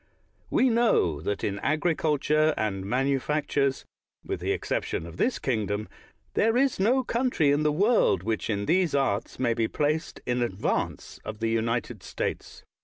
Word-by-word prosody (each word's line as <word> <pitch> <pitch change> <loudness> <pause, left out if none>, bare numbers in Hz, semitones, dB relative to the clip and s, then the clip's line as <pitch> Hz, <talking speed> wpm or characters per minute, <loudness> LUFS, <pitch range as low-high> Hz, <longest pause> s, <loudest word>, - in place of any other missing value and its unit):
We 260 -1 +3
know 220 - +2
that 100 +5 -3
in 100 0 -1
agriculture 155 0 +1
and 95 -3 -2
manufactures, 140 +2 0 0.4
with - - -3
the - - -1
exception 80 - -2
of 85 -1 -10
this 250 - +1
kingdom, 110 -4 -2 0.5
there 225 +2 +2
is 270 -4 +2
no 250 +7 +3
country 235 - +1
in 145 +1 +2
the 150 0 +2
world 190 - +3
whioh 110 0 -2
in 100 -2 -1
these 175 - +2
arts 125 -6 0
may 120 -2 +1
be 115 -1 0
placed 155 +4 -1
in 125 0 0
advance 105 -5 -2
of 110 - -6
the 115 +1 -1
United 115 -1 -1
States. 95 -1 -5
135 Hz, 155 wpm, -27 LUFS, 110-160 Hz, 0.5 s, We